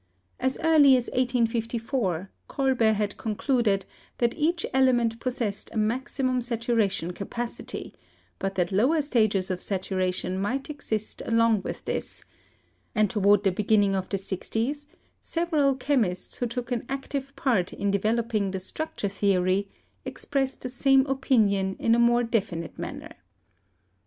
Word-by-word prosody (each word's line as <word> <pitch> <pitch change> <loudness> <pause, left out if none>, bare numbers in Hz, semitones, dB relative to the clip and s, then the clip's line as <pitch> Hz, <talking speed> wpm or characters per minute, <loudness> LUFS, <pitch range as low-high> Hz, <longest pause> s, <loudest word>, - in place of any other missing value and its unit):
As 260 +1 0
early 295 -5 +6
as 245 - -3
1854, 230 - -1 0.2
Kolbe 260 -5 +2
had 205 0 -2
concluded 220 -3 0 0.3
that 235 -1 +1
each 330 +2 0
element 240 -4 +3
possessed 235 -5 -3
a - - -11
maxi 250 +5 0
mum 255 -1 +1
saturation 230 -7 0
capacity, 235 +5 -5 0.5
but 195 0 -2
that 180 0 0
lower 255 +12 +3
stages 215 -9 +1
of 180 - -2
satura 185 -1 -1
tion 185 0 -3
might 265 +9 -2
exist 220 -7 -4
along 230 -2 +3
with - - -6
this; - - -4 0.7
and 215 -2 +3
toward 205 -2 +4
the 195 - +3
begin 210 +3 +2
ning 195 -1 +2
of 190 -1 -3
the 200 - 0
sixties, 225 +9 -3 0.3
several 310 -5 +1
chemists 245 -10 -1
who 245 - -1
took 245 +1 -5
an 240 -2 -1
active 275 0 -4
part 210 -9 +1
in 200 0 -1
developing 215 0 0
the 190 0 -3
structure 210 +3 -4
theory 195 0 +1 0.3
expressed 270 -2 -3
the 255 - -4
same 265 +1 +4
opinion 215 -8 +2
in 230 - +2
a 235 - +4
more 240 0 +4
definite 200 -8 -2
manner. - - -6
230 Hz, 140 wpm, -26 LUFS, 200-260 Hz, 0.7 s, early